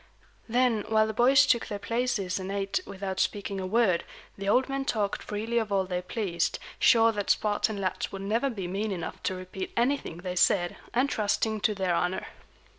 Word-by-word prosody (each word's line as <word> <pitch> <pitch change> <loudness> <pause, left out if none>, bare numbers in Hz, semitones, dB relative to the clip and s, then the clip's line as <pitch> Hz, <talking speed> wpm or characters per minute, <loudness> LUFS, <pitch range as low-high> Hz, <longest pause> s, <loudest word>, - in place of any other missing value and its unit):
Then, 240 -2 +2
while 220 -1 +4
the 220 - -3
boys 265 +5 +5
took 235 -4 +2
their 205 - -4
places 205 -4 -1
and 190 +1 -5
ate 195 - -1
without 190 -1 -4
speaking 200 -1 -1
a 185 - -3
word, 200 -4 +2 0.3
the 195 0 -3
old 255 +5 +3
men 275 0 -2
talked 210 -6 -1
freely 225 +3 -1
of 220 -2 -3
all 195 -1 +2
they 180 -1 -2
pleased, 180 -2 -1 0.2
sure 230 -1 +6
that 205 -2 -3
Spartan 210 0 +1
lads 185 -2 -2
would 195 0 -6
never 230 +7 +1
be 200 -7 -4
mean 200 +4 -2
enough 175 -4 -5
to 185 - -1
repeat 185 +1 -6
anything 240 - 0
they 180 +1 -5
said, 175 -1 +3 0.2
and 250 +3 +2
trusting 215 -2 0
to 210 +2 +2
their 190 -2 0
honor. 180 +2 0
205 Hz, 190 wpm, -28 LUFS, 190-230 Hz, 0.3 s, sure